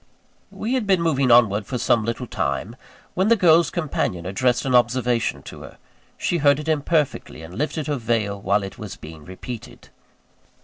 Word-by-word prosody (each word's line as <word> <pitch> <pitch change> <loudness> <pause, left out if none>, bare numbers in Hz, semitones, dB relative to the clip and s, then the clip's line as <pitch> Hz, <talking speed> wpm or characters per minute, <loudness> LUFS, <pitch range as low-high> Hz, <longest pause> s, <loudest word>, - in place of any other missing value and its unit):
We 230 +4 -4
had 250 -6 -1
been 190 -2 +3
moving 140 -5 +1
onward 110 -4 +4
for 125 - -3
some 115 -1 +2
little 115 +2 -3
time, 100 - -3 0.4
when 190 +3 +1
the 230 - +5
girl's 170 -5 +4
companion 135 - -2
addressed 125 +8 0
an 130 - 0
observation 120 -1 +1
to - - -10
her. - - -12 0.4
She 175 - 0
heard 145 -1 +4
it 150 - -7
imperfectly, 150 - -1
and 85 +3 -10
lifted 150 - -2
her 145 -1 -1
veil 110 -4 -1
while 100 +1 +1
it 95 - -8
was 105 -3 -7
being 80 0 -11
repeated. 100 +7 -9
125 Hz, 175 wpm, -22 LUFS, 100-155 Hz, 0.4 s, the